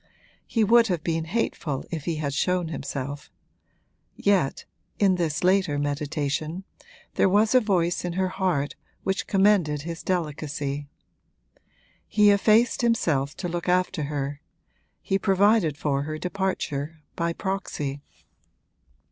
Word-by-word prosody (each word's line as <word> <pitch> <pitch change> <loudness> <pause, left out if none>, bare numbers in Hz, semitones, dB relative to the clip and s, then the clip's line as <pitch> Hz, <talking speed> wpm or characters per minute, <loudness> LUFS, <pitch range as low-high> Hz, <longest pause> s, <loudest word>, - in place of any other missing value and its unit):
He 225 - +1
would 230 +2 +5
have 175 -6 -1
been 165 -1 -1
hateful 160 - -2
if 160 -4 -4
he 170 - -1
had 145 -2 -2
shown 180 +2 0
himself; 140 -2 -5 0.9
yet 190 -9 +1 0.3
(in 195 -2 +4
this 165 -4 -1
later 185 -5 +3
meditation) 145 +3 -2 0.5
there - - +3
was 210 +4 +3
a 255 - +7
voice 180 -5 +1
in 175 -1 -3
her 185 +1 0
heart 180 -7 -1 0.3
which 190 0 -1
commended 190 -8 +3
his 165 0 -5
delicacy. 145 -4 -3 1.2
He 210 -1 +5
effaced 215 +5 +4
himself 160 - +1
to 180 - -4
look 175 +1 -3
after 180 -3 +1
her 145 0 -3 0.6
he 195 -1 0
provided 195 -5 +3
for 140 -2 0
her 155 +2 -4
departure 165 -5 -3
by 170 0 0
proxy. 165 -7 -3
170 Hz, 125 wpm, -25 LUFS, 145-195 Hz, 1.2 s, a